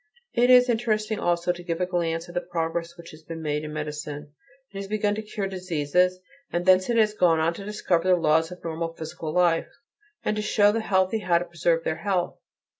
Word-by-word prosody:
It 245 Hz, +1 st, +3 dB
is 250 Hz, 0 st, +7 dB
interesting 220 Hz, -2 st, 0 dB
also 175 Hz, 0 st, +1 dB
to 175 Hz, 0 st, -7 dB
give 170 Hz, -1 st, -3 dB
a 180 Hz, -, +1 dB
glance 170 Hz, -2 st, -2 dB
at 175 Hz, -, -11 dB
the 175 Hz, -, -1 dB
progress 170 Hz, -1 st, -3 dB
which 170 Hz, -1 st, -11 dB
has 155 Hz, -, -14 dB
been 165 Hz, +1 st, -8 dB
made 150 Hz, 0 st, -1 dB
in 150 Hz, -, -6 dB
medicine; 150 Hz, -1 st, -6 dB, 0.4 s
it 195 Hz, -, -9 dB
has 195 Hz, -, -5 dB
begun 210 Hz, 0 st, 0 dB
to 215 Hz, -, -3 dB
cure 210 Hz, -2 st, -4 dB
diseases; 180 Hz, -1 st, 0 dB, 0.3 s
and 175 Hz, +1 st, -1 dB
thence 185 Hz, +1 st, +5 dB
it 235 Hz, -, +2 dB
has 215 Hz, -1 st, +4 dB
gone 170 Hz, -6 st, +3 dB
on 165 Hz, +2 st, +1 dB
to 200 Hz, -, -8 dB
discover 185 Hz, -4 st, 0 dB
the 185 Hz, -, +6 dB
laws 160 Hz, 0 st, +2 dB
of 180 Hz, -, -10 dB
normal 165 Hz, 0 st, -4 dB
physical 160 Hz, 0 st, -6 dB
life, 170 Hz, -1 st, +2 dB, 0.6 s
and 215 Hz, -, +1 dB
to -, -, 0 dB
show 205 Hz, -1 st, +4 dB
the 225 Hz, -, -1 dB
healthy 190 Hz, +1 st, +1 dB
how 180 Hz, -4 st, +2 dB
to 175 Hz, -, -2 dB
preserve 170 Hz, -1 st, 0 dB
their 160 Hz, -, -2 dB
health. 190 Hz, -4 st, -1 dB
175 Hz, 220 wpm, -25 LUFS, 165-200 Hz, 0.6 s, is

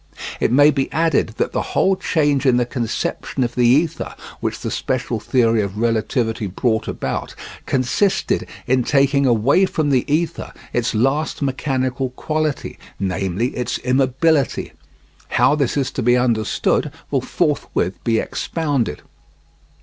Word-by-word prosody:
It -, -, +1 dB
may 145 Hz, +4 st, +6 dB
be 135 Hz, -2 st, -1 dB
added 160 Hz, -8 st, +1 dB
that -, -, 0 dB
the -, -, -1 dB
whole 190 Hz, 0 st, +1 dB
change 145 Hz, -6 st, +1 dB
in 125 Hz, -1 st, +4 dB
the 125 Hz, -, +2 dB
conception 120 Hz, +2 st, -2 dB
of 120 Hz, 0 st, -2 dB
the 120 Hz, -1 st, +3 dB
ether 150 Hz, +6 st, +1 dB, 0.2 s
which -, -, -3 dB
the -, -, -3 dB
special 125 Hz, -3 st, -2 dB
theory 115 Hz, -1 st, +2 dB
of 100 Hz, 0 st, -4 dB
relativity 115 Hz, -1 st, 0 dB
brought 110 Hz, +4 st, -1 dB
about, -, -, -4 dB, 0.3 s
consisted 135 Hz, +10 st, +1 dB, 0.2 s
in 130 Hz, 0 st, +2 dB
taking 140 Hz, +1 st, +3 dB
away 130 Hz, -, +3 dB
from 155 Hz, -5 st, -1 dB
the 130 Hz, +1 st, +1 dB
ether 165 Hz, +2 st, -1 dB, 0.2 s
its 120 Hz, -1 st, 0 dB
last 135 Hz, +7 st, 0 dB
mechanical 130 Hz, -1 st, -1 dB
quality, 155 Hz, +3 st, -3 dB, 0.2 s
namely, 95 Hz, +4 st, -1 dB
its 125 Hz, -1 st, -2 dB
immobility. 135 Hz, +3 st, +1 dB, 0.6 s
How -, -, +5 dB
this 145 Hz, -3 st, 0 dB
is 135 Hz, -2 st, 0 dB
to -, -, -3 dB
be 120 Hz, +1 st, +4 dB
understood 115 Hz, -4 st, +1 dB, 0.2 s
will -, -, +1 dB
forthwith 90 Hz, 0 st, -1 dB
be 115 Hz, -1 st, +2 dB
expounded. 140 Hz, -, -2 dB
130 Hz, 140 wpm, -20 LUFS, 115-145 Hz, 0.6 s, may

